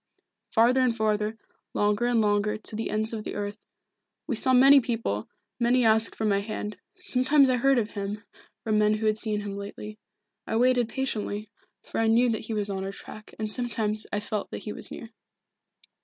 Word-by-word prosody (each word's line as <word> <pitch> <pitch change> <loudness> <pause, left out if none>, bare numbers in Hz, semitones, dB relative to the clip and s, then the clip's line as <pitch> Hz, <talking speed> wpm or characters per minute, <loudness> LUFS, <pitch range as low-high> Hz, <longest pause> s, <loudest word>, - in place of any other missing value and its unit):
Farther 245 +3 +4
and 245 -3 +1
farther, 215 0 0 0.4
longer 210 +3 +1
and 240 -1 +2
longer, 205 0 +1
to 215 - -2
the 225 - -3
ends 215 +1 -1
of 215 -1 -4
the - - -6
earth. 205 +1 -4 0.7
We 265 - -2
saw 260 +4 +1
many 270 +2 +8
people, 225 - -3 0.3
many 245 +1 +3
asked 220 0 +4
for 220 - -2
my 200 -2 +2
hand. 210 0 -5 0.2
Sometimes 275 -5 +3
I 250 - +2
heard 270 +2 +3
of 220 -3 -1
him, 205 0 -5 0.4
from 215 -1 +1
men 210 0 +3
who 215 +1 -3
had 215 0 +2
seen 215 -2 -1
him 200 -1 -5
lately. 210 +1 -8 0.5
I - - -2
waited 245 -1 +3
patiently, 215 -5 -3 0.3
for - - -5
I 225 - +2
knew 235 +2 +4
that 220 -1 -3
he 225 - -4
was 205 -1 0
on 195 -1 -3
our 195 - -4
track, 215 +2 -12
and 215 -1 -3
sometimes 215 -3 -1
I 205 - 0
felt 210 0 -4
that - - -7
he 210 - -5
was - - -3
near." 230 - -9
220 Hz, 200 wpm, -26 LUFS, 210-240 Hz, 0.7 s, many